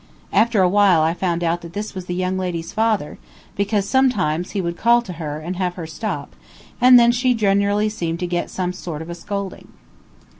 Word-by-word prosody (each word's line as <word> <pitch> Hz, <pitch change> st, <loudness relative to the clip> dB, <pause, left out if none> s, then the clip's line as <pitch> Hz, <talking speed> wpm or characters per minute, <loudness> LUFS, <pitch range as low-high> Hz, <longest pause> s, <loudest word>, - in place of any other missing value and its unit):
After 220 Hz, -3 st, +3 dB
a -, -, +5 dB
while 190 Hz, -3 st, +4 dB
I 160 Hz, +1 st, +2 dB
found 175 Hz, -1 st, -1 dB
out 170 Hz, +1 st, 0 dB
that 170 Hz, 0 st, -10 dB
this 210 Hz, +2 st, -5 dB
was 185 Hz, -2 st, -6 dB
the 180 Hz, -, -3 dB
young 185 Hz, +1 st, -1 dB
lady's 175 Hz, -3 st, -4 dB
father, 215 Hz, -7 st, 0 dB, 0.4 s
because 200 Hz, 0 st, 0 dB
sometimes 200 Hz, -, +1 dB
he 200 Hz, -, -3 dB
would 170 Hz, -2 st, -2 dB
call 235 Hz, +5 st, +3 dB
to 185 Hz, -, -7 dB
her 150 Hz, -1 st, -4 dB
and 170 Hz, +4 st, -5 dB
have 180 Hz, -1 st, -1 dB
her 170 Hz, -, -6 dB
stop, 160 Hz, +7 st, -5 dB, 0.5 s
and 250 Hz, 0 st, +8 dB
then 235 Hz, 0 st, +5 dB
she 250 Hz, +1 st, +1 dB
generally 205 Hz, 0 st, +2 dB
seemed 170 Hz, -6 st, -3 dB
to -, -, 0 dB
get 175 Hz, 0 st, -2 dB
some 180 Hz, -1 st, -3 dB
sort 165 Hz, -4 st, -6 dB
of 170 Hz, -, -8 dB
a -, -, -3 dB
scolding. 200 Hz, +2 st, -6 dB
185 Hz, 210 wpm, -21 LUFS, 170-210 Hz, 0.5 s, and